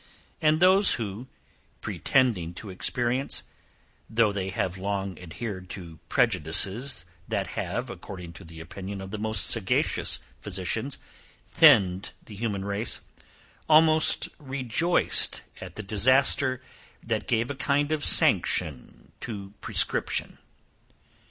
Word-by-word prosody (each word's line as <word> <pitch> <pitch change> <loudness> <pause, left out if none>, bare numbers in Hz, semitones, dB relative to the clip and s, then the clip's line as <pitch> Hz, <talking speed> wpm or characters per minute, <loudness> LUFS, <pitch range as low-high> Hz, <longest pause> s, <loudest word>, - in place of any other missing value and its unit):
And 155 0 +3
those 190 +3 +5
who, 110 +2 -6 0.5
pretending 105 -11 0
to 100 +1 -8
experience, 120 +7 -1 0.7
though 110 -1 +2
they 95 -2 -3
have 95 0 -3
long 100 -1 -3
adhered 95 +2 -7
to 85 -4 -11
prejudices 95 - +2 0.2
that - - -2
have, - - -3
according 90 -3 -9
to - - -12
the 80 0 -12
opinion 95 +4 -7
of 95 0 -8
the 110 - -5
most 110 -3 -1
sagacious - - +1 0.2
physicians, - - -3 0.5
thinned 100 - +4
the 110 - -11
human 100 -2 -3
race, 100 +3 -1 0.7
almost 155 0 +5
rejoiced 140 +4 +1 0.2
at - - -9
the 110 - -6
disaster 130 +5 +2 0.4
that 110 -2 -3
gave 120 +2 0
a - - -5
kind 140 +3 0
of 155 -2 -1
sanction 70 -5 +1
to 100 -3 -7
prescription. - - 0
110 Hz, 115 wpm, -26 LUFS, 95-130 Hz, 0.7 s, those